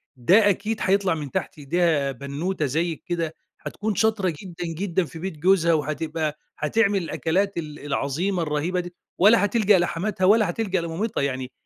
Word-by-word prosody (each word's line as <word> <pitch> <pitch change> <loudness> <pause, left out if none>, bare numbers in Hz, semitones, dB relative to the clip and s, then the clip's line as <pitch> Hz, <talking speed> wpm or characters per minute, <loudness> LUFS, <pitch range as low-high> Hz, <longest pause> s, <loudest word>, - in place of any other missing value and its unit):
ده 195 - +5
أكيد 215 +3 -1
هيطلع 195 -2 +2
من 145 -4 -6
تحت - - -3
إيديها 145 -1 +1
بنّوتة 145 +6 -3
زيِّك 160 +3 -2
كده، 165 -2 -2 0.3
هتكون 210 0 -3
شاطرة 215 -6 +1
جدًا، 175 -2 -7
جدًا 185 0 -1
في 160 - -10
بيت 185 -3 -5
جوزها 170 0 +3
وهتبقى 155 0 -2 0.2
هتعمل 200 +4 +1
الأكلات 190 +5 -1
ال 150 -3 -5
العظيمة 160 +7 -1
الرهيبة 155 +4 -1
دي، 175 0 -6 0.2
ولا 205 +2 +6
هتلجأ 205 -3 +3
لحماتها 185 +2 -1
ولا 210 -1 +5
هتلجأ 190 -2 -1
لمامتها، 170 +6 -2
يعني 130 -2 -3
175 Hz, 155 wpm, -24 LUFS, 155-195 Hz, 0.3 s, ولا